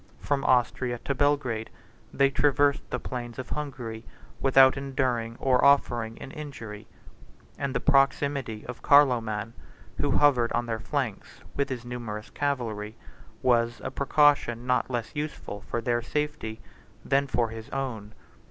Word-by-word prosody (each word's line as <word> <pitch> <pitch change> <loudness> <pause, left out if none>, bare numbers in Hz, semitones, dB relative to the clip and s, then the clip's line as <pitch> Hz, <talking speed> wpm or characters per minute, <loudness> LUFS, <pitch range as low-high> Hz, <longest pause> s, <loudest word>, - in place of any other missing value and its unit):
From 140 -1 -1
Austria 125 0 +2
to 140 - 0
Belgrade, 130 -5 0 0.4
they 140 0 +3
traversed 145 0 +2
the - - -1
plains 120 -2 -6
of 130 - -6
Hungary, 125 -7 -5 0.4
without 135 -1 +6
enduring 130 -4 -1
or 130 -2 +3
offering 120 -5 +3
an 135 - -8
injury; 115 -9 -8 0.7
and 140 -2 -2
the - - +2
proximity 135 -4 +1
of 120 -2 -8
Carloman, 115 -6 +3 0.4
who 145 - 0
hovered 130 -4 +4
on 120 - 0
their 115 -1 -3
flanks 125 -3 -4
with 140 - 0
his 125 -2 -5
numerous 115 -3 -6
cavalry, 115 -7 -3 0.5
was 120 -2 +2
a - - -3
precaution 140 -4 +2
not 125 0 +1
less 120 -3 -3
useful 145 -9 -5
for 120 - -3
their 120 +1 0
safety 120 -4 -3 0.4
than 140 0 +2
for 120 -3 0
his 110 0 -9
own. 115 -6 -4
125 Hz, 140 wpm, -27 LUFS, 115-140 Hz, 0.7 s, without